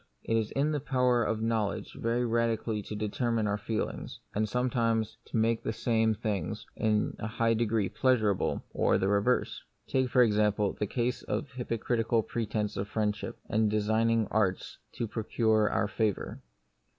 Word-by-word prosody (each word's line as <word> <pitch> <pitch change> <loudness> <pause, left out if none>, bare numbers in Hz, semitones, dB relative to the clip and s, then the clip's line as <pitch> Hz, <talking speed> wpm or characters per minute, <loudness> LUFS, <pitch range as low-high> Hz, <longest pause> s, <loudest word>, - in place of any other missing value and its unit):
It 115 - 0
is 110 -2 +1
in 145 +3 +1
the 150 - 0
power 125 -3 +2
of 110 0 -1
knowledge 110 -3 -1
very 120 +2 0
radically 115 -2 0
to 105 - -7
determine 110 +2 0
our 105 0 0
feelings, 110 +1 -3
and 110 +1 0
sometimes 115 -3 0
to - - -3
make 115 +1 +2
the - - -2
same 115 +2 -2
io 115 0 +4
The - - +4
Mystery 110 - 0
of 110 - -29
Pain. 105 -4 0
things - - -6
in 105 -1 +1
a 110 - -3
high 115 +1 +1
degree 110 -3 +1
pleasurable, 110 -7 +1
or - - +3
the 95 - 0
re 100 0 +3
verse. 125 +4 0 0.2
Take, 130 -1 +1
for 125 0 +5
example, 105 -2 +2
the 105 - -2
case 120 +3 -1
of 140 - -3
hypo 125 -2 -3
critical 115 0 +1
pretence 105 -3 -2
of 100 +1 -2
friendship, 105 +1 -2
and 110 -1 +2
designing 110 +2 +2
arts 95 -4 0
to 120 - -2
procure 110 0 +1
our 100 - +1
favour. 105 -1 -2
110 Hz, 185 wpm, -30 LUFS, 105-115 Hz, 0.2 s, for